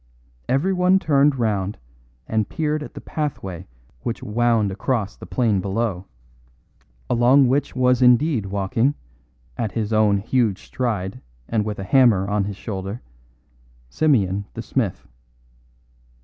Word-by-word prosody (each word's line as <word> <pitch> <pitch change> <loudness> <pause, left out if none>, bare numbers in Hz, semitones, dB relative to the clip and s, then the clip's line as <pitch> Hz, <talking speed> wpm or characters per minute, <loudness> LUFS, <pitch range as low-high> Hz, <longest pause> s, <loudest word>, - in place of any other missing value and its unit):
Everyone 180 +6 +3
turned 145 -5 +3
round 105 -4 -1 0.5
and 110 -2 0
peered 155 -1 -1
at 150 - -9
the - - -6
pathway 95 - -4 0.3
which 120 - -4
wound 115 -2 +1
across 105 0 -2
the - - -11
plain 110 -6 +1
below, 100 -1 -2 1.0
along 125 +3 +4
which 135 +4 0
was 125 0 +3
indeed 125 -2 +4
walking, 100 +8 0 0.6
at 110 -5 -2
his 110 +1 -2
own 105 -2 +4
huge 110 -1 0
stride 105 -7 -3 0.3
and 110 -2 0
with 105 -1 -3
a 95 - -5
hammer 110 -5 +4
on 100 -1 0
his 100 -1 -5
shoulder, 100 +2 -5 0.9
Simeon 100 - +1
the 115 - -5
smith. 115 -6 -2
115 Hz, 125 wpm, -22 LUFS, 100-130 Hz, 1.0 s, along